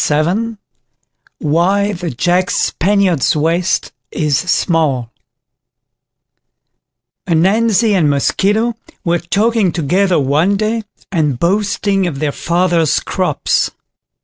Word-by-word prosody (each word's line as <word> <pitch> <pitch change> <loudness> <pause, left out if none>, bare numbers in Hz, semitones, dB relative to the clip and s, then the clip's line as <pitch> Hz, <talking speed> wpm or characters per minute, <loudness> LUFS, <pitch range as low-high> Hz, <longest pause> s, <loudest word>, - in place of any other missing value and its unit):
APPENDIX 185 +10 0 0.8
WHY 185 +7 +1
THE 175 -3 -4
JACK 175 +8 0
SPANIARD'S 190 -6 +1
WAIST 165 +4 0 0.2
IS 150 -2 0
SMALL 155 -8 0 2.2
Ananzi 210 +6 +2
and 170 -6 +2
Mosquito 205 - +1 0.3
were 170 0 +1
talking 205 +3 +1
together 180 +4 +1
one 150 +9 +1
day, 220 +2 -1 0.3
and 150 -8 0
boasting 195 - 0
of 155 -5 -4
their 145 +1 -1
fathers' 170 -1 +1
crops. - - -1
175 Hz, 95 wpm, -15 LUFS, 155-200 Hz, 2.2 s, Ananzi